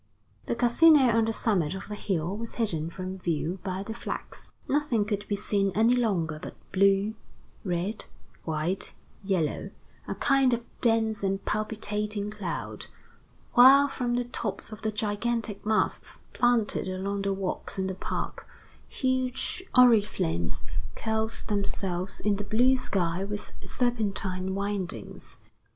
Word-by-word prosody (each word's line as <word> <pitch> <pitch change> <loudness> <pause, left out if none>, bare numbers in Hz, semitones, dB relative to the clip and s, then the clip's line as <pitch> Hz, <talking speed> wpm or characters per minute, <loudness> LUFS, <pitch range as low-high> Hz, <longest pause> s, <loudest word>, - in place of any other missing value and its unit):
The - - 0
Casino 255 +1 +6
on 225 -1 +4
the 225 - 0
summit 190 -8 +1
of 190 - -7
the 210 - -5
hill 190 -3 -2
was 230 +1 -5
hidden 165 -9 -1
from 185 +2 -6
view 170 +1 -1
by 190 0 -3
the 220 - -5
flags. 235 - -6 0.2
Nothing 275 -7 +1
could 205 -1 -2
be 205 - 0
seen 200 -1 +1
any 225 +3 +5
longer 175 -10 0
but - - -7 0.2
blue, 195 +2 +3 0.5
red, 185 +3 -2 0.4
white, 160 +4 -2 0.3
yellow, 185 -6 0 0.4
a - - -3
kind 270 -3 +3
of 235 0 -8 0.2
dense 225 -2 +2
and 195 0 -1
palpitating 210 -1 -2
cloud; 200 -5 -5 0.7
while 270 +3 +8
from 245 -3 -1
the 245 0 0
tops 230 -3 -5
of 215 - -8
the 220 - -1
gigantic 215 0 -2
masts 215 0 0
planted 240 -5 +2
along 195 +2 -2
the 200 0 0
walks 195 0 -3
in 190 - 0
the 190 - -2
park, 185 - -4 0.4
huge 260 +5 -1
oriflammes 205 - +3 0.3
curled 220 0 -2
themselves 190 -3 0
in 205 -1 +1
the 205 - -3
blue 245 +6 +4
sky 185 -7 -1
with 205 +1 -5
serpentine 195 -6 -1
windings. 195 - -4
205 Hz, 135 wpm, -28 LUFS, 190-230 Hz, 0.7 s, while